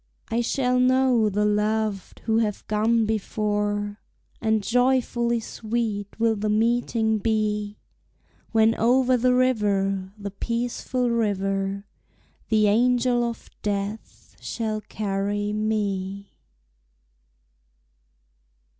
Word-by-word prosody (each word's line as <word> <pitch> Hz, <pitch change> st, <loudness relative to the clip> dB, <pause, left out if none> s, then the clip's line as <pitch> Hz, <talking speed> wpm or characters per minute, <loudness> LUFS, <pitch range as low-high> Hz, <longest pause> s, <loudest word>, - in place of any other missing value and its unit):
I 230 Hz, +1 st, +1 dB
shall 250 Hz, +1 st, +1 dB
know 255 Hz, -3 st, +3 dB
the 210 Hz, +1 st, 0 dB
loved 210 Hz, -1 st, -1 dB
who 225 Hz, 0 st, +1 dB
have 210 Hz, -3 st, -2 dB
gone 220 Hz, +2 st, +2 dB
before, 205 Hz, -1 st, -1 dB, 0.4 s
And 220 Hz, -2 st, +1 dB
joyfully 240 Hz, 0 st, +1 dB
sweet 220 Hz, -2 st, -4 dB
will 225 Hz, -1 st, +3 dB
the 210 Hz, +1 st, -2 dB
meeting 220 Hz, 0 st, +1 dB
be, 210 Hz, -1 st, -1 dB, 0.7 s
When 225 Hz, 0 st, +4 dB
over 250 Hz, +3 st, +3 dB
the 250 Hz, +1 st, +3 dB
river, 200 Hz, -6 st, +1 dB
the 200 Hz, -1 st, -6 dB
peaceful 240 Hz, +3 st, -2 dB
river, 195 Hz, -3 st, -1 dB, 0.6 s
The 215 Hz, -1 st, +4 dB
angel 245 Hz, +3 st, +3 dB
of 235 Hz, -1 st, -4 dB
death 205 Hz, +1 st, -5 dB
shall 215 Hz, -2 st, -3 dB
carry 205 Hz, 0 st, -2 dB
me. 200 Hz, -2 st, -2 dB
215 Hz, 95 wpm, -24 LUFS, 205-235 Hz, 0.7 s, When